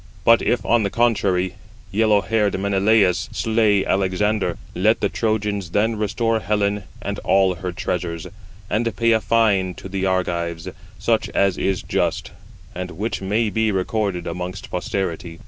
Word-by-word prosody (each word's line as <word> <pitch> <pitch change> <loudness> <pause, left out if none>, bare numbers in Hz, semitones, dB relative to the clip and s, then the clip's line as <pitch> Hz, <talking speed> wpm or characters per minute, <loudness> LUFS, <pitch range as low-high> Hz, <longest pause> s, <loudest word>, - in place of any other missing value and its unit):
But 115 0 +6
if, 120 - 0
on 120 -1 +3
the 100 - 0
contrary, 95 -6 +1 0.4
yellow 105 0 +3
haired 105 +1 0
Menelaus 100 -1 +2
slay 110 -3 +2
Alexander, 100 +2 0 0.2
let 110 +5 +2
the - - +1
Trojans 105 -4 -1
then 110 +5 +1
restore 110 +2 0
Helen 105 -1 0 0.2
and - - -3
all 95 -1 +3
her 90 0 -5
treasures, 85 -2 -3 0.4
and 115 0 -1
pay 115 0 +3
a 110 -1 +3
fine 100 -6 +2
to - - -9
the 95 0 -2
Argives 85 -2 -1 0.3
such - - 0
as 100 -2 +3
is 95 -2 0
just, - - -1 0.4
and 90 0 -5
which 100 +7 -4
may 105 +3 0
be 110 0 +1
[recorded] 95 -2 -1
amongst 90 +2 -5
posterity. 90 -2 -3
100 Hz, 145 wpm, -21 LUFS, 90-110 Hz, 0.4 s, But